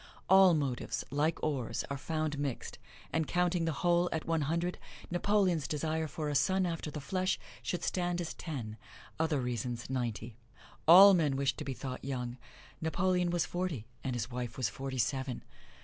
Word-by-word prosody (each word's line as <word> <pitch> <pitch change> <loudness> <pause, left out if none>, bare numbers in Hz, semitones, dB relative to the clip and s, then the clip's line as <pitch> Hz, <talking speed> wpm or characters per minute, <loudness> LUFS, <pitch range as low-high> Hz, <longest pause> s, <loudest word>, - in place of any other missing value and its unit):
All 190 -2 +7
motives, 140 -5 -2
like 150 +3 +1
ores, 130 -6 -1
are - - 0
found 155 0 -2
mixed, 140 -4 -4 0.3
and 160 -2 +1
counting 175 -1 +1
the 165 - +1
whole 175 0 +4
at 160 - -2
one 165 -1 +1
hundred, 170 +5 -1 0.3
Napoleon's 180 -3 +2
desire 160 +1 -1
for 155 0 -4
a 145 - -1
son 185 +7 +2
after 165 -3 -3
the 150 - -5
flesh 185 +6 0 0.2
should 180 - -3
stand 175 -1 0
as 170 -2 -3
ten 120 -10 -6 0.4
other 160 -3 +1
reasons 120 0 -3
ninety. 115 -3 -3 0.5
All 195 +4 +10
men 155 -6 +2
wish 135 -1 +1
to - - -6
be 135 - -3
thought 130 -1 -6
young. 125 -2 -3 0.4
Napoleon 180 +2 +1
was 175 -1 +1
forty, 175 -11 -3 0.2
and 130 -2 -2
his 120 +1 -3
wife 120 -2 -4
was 125 -5 0
forty 135 +5 -5
seven. 130 +1 -1
150 Hz, 170 wpm, -32 LUFS, 130-175 Hz, 0.5 s, All